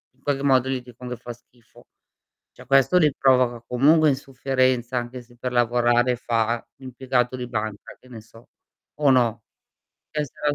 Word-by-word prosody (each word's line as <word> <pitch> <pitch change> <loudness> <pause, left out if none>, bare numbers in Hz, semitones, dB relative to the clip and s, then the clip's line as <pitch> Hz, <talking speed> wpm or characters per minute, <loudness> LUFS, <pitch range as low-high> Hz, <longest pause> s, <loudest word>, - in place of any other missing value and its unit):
In 130 - -34
qualche 140 -1 -1
modo 130 -2 +3
gli 130 -2 -2
dicon 125 0 -12
che 125 - -4
fa 120 - -8
schifo. 120 0 -23 0.7
Cioè, - - -16
questo 135 +7 +4
li 155 -4 +3
provoca 125 -3 +2
comunque 150 +6 +4
insofferenza, 130 -2 -1
anche 120 +1 -7
se 120 0 -22
per 125 +1 -5
lavorare 120 +1 +2
fa 115 -1 -1
l'impiegato 130 -1 -2
di 125 -1 -6
banca, 110 -3 -5
che 130 - -20
ne 115 -3 -10
so, 115 +1 -19 0.5
o 145 -2 +3
no? 120 -3 +2 0.7
Essere 150 -1 -2
125 Hz, 160 wpm, -23 LUFS, 120-135 Hz, 0.7 s, questo